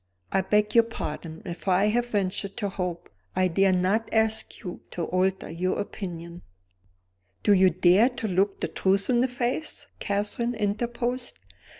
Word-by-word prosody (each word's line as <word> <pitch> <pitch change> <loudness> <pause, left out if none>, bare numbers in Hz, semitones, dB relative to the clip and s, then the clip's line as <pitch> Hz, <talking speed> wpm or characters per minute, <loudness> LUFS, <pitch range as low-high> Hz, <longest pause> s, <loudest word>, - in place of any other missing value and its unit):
"I 190 - +3
beg 210 +2 +1
your 230 -1 +6
pardon, 160 -7 -6
if 175 +2 -7
I 190 +3 +4
have 240 +2 +1
ventured 200 -2 -2
to 205 -4 -1
hope. 180 -2 -4 0.3
I 185 0 +3
dare 195 +2 +3
not 190 +5 +1
ask 220 +1 +1
you 180 -3 -6
to 175 - -4
alter 185 +3 0
your 180 +3 -2
opinion 175 -4 -6 0.5
" 90 0 -44
"Do 205 - +5
you 190 -1 +6
dare 185 +7 +5
to 240 -3 -4
look 195 +1 +1
the - - 0
truth 195 +3 +1
in 240 -1 +3
the 255 - +3
face?" 250 +4 -3
Catherine 210 +4 -1
interposed. 240 +4 -2
195 Hz, 165 wpm, -26 LUFS, 180-225 Hz, 0.5 s, your